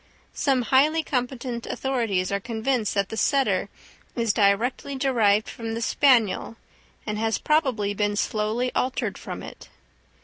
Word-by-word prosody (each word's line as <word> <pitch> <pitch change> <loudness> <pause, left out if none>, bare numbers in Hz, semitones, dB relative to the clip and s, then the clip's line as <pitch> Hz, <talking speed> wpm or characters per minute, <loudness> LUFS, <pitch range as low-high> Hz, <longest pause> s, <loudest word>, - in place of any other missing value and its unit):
Some 265 -3 +1
highly 300 +6 +3
competent 250 -3 -3
authorities 225 -9 -1
are 200 - 0
convinced 230 +1 -1
that 200 -1 0
the 220 - -5
setter 275 +3 +1 0.5
is 230 -3 +1
directly 225 +7 +1
derived 225 -6 +2
from 225 -1 -5
the 230 - -4
spaniel, 235 -5 +2 0.5
and 210 -1 -3
has 225 0 0
probably 260 -10 +1
been 205 0 0
slowly 220 +4 -1
altered 255 +1 -1
from - - -7
it. - - -11
235 Hz, 135 wpm, -25 LUFS, 210-265 Hz, 0.5 s, highly